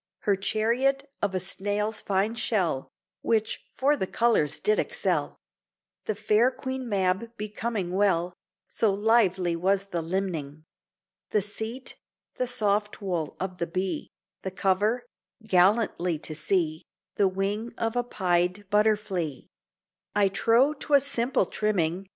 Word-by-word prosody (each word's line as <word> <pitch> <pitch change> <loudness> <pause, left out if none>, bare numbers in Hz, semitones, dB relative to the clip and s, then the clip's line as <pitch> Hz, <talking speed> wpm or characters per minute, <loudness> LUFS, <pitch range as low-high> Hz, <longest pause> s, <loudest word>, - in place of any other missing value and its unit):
Her 200 - +2
chariot 240 +8 +1
of 195 -2 0
a - - +1
snail's 205 +3 -2
fine 200 +3 0
shell, 185 - 0 0.3
Which 220 -1 0
for 285 +3 +2
the 190 - -2
colours 225 -11 +2
did 430 +2 +2
excel; - - -1 0.7
The 215 - -1
fair 215 +3 +3
Queen 260 -1 -5
Mab 200 +3 0
becoming 210 -2 -3
well, 180 -3 +2 0.3
So 220 -3 +1
lively 195 -4 +2
was 195 +3 0
the 170 - -1
limning: 160 -4 -3 0.6
The 210 - +1
seat, 220 +5 -5 0.4
the 255 - 0
soft 210 -3 0
wool 175 -7 -3
of 185 -1 -4
the 170 - -1
bee, 185 +2 -3 0.3
The 190 - -3
cover 205 +6 +1 0.4
(gallantly 185 -3 +3
to 155 +1 -5
see) 160 -1 0 0.4
The 200 - +4
wing 200 +4 -2
of 225 +1 -1
a 245 - +3
pied 180 -2 0
butterflee; 205 -8 +1 0.7
I 200 -1 +4
trow 235 +8 +3
'twas 285 -1 +2
simple 255 -5 +1
trimming. 190 -2 -1
205 Hz, 130 wpm, -27 LUFS, 185-225 Hz, 0.7 s, The